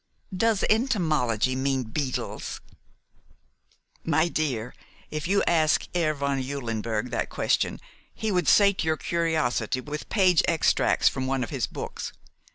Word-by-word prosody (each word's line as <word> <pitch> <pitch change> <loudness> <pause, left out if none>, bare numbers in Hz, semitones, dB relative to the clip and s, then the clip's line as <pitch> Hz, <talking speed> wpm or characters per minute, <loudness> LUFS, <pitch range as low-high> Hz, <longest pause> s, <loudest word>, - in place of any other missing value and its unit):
"Does 225 +1 +2
entomology 155 - +1
mean 135 0 0
beetles?" 130 +3 -4 1.4
"My 160 +1 +2
dear, 125 -8 -2 0.4
if 155 +1 -3
you 200 +2 +2
asked 155 -2 +2
Herr 160 -3 +1
von 140 -1 -1
Eulenberg 115 -4 -3
that - - -2
question - - 0 0.3
he 220 -1 -3
would 180 -2 +1
sate 200 -3 +5
your 160 0 +1
curiosity 155 -10 0
with 150 +3 -6
page 185 -5 +4
extracts 165 -2 +2
from 130 -1 0
one 135 -1 0
of 115 - -6
his - - -1
books. - - -6
150 Hz, 130 wpm, -26 LUFS, 130-170 Hz, 1.4 s, sate